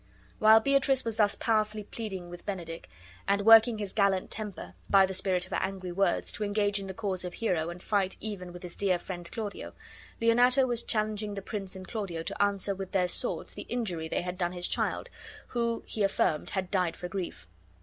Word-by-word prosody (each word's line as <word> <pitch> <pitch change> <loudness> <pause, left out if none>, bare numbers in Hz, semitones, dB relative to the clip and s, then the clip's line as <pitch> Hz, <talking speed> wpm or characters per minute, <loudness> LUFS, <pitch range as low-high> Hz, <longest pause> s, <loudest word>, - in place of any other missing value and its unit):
While 220 +1 +7
Beatrice 275 0 +3
was 225 -1 -2
thus 205 -2 +3
powerfully 215 -1 0
pleading 195 -5 -6
with 175 0 -9
Benedick, 170 -5 -5 0.4
and 200 0 +2
working 225 0 +8
his 205 -2 -4
gallant 200 -3 +2
temper, 200 - -6 0.2
by 195 -1 +7
the 190 - -4
spirit 185 -1 +1
of 185 - -17
her - - 0
angry 190 -1 -3
words, 190 0 +1
to 215 - -3
engage 205 0 +1
in 195 - -6
the 190 - -6
cause 190 -4 -2
of 180 - -5
Hero 175 -7 0
and 175 +1 -8
fight 195 -3 +1
even 195 -5 -6
with 175 +1 -10
his 175 -1 -6
dear 190 -3 +2
friend 175 -1 -7
Claudio, 210 -3 -5 0.5
Leonato 245 +3 +5
was 240 -2 -1
challenging 215 -2 -1
the 195 - -4
prince 195 -3 -5
and 185 0 -8
Claudio 195 -8 -4
to - - -3
answer 200 -1 +1
with 195 0 -7
their 185 -2 +3
swords - - -4
the - - -8
injury 185 -10 -2
they 160 - -1
had 180 +1 -5
done 175 0 0
his 180 0 0
child, - - -1 0.4
who, 235 -1 -1
be 215 - -2
affirmed, 195 -6 +1
had 190 -2 -3
died 180 -4 +1
for 180 - -5
grief. 180 - -5
195 Hz, 205 wpm, -29 LUFS, 180-215 Hz, 0.5 s, working